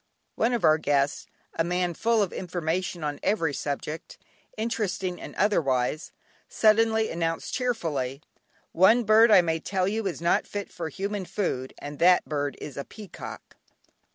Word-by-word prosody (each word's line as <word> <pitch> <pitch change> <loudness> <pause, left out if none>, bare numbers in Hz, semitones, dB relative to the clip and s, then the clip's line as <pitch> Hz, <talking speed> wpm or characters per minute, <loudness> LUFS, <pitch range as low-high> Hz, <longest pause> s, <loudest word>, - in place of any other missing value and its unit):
One 235 +2 +1
of 235 - -1
our 155 0 +5
guests, 140 -1 0 0.3
a 165 - 0
man 180 +1 0
full 225 +4 +2
of 190 - -4
information 175 -1 -3
on 145 -1 -3
every 165 -8 +1
subject, 150 +3 -5 0.4
interesting 195 -5 -2
and - - -9
otherwise, 155 -6 +1 0.4
suddenly 220 0 +3
announced 165 -1 -2
cheerfully: 155 - -2 0.5
"One 215 +8 +5
bird 220 +2 +6
I 200 -4 +8
may 165 -1 -1
tell 185 +2 -1
you 215 +1 -1
is 180 - -4
not 170 +1 +1
fit 205 -1 -5
for 165 -2 -5
human 200 +2 -4
food, 130 -10 -3
and 145 0 -8
that 180 +1 +5
bird 145 -2 -2
is 145 - -8
a 140 - -3
peacock." 210 +4 -10
180 Hz, 155 wpm, -26 LUFS, 155-210 Hz, 0.5 s, I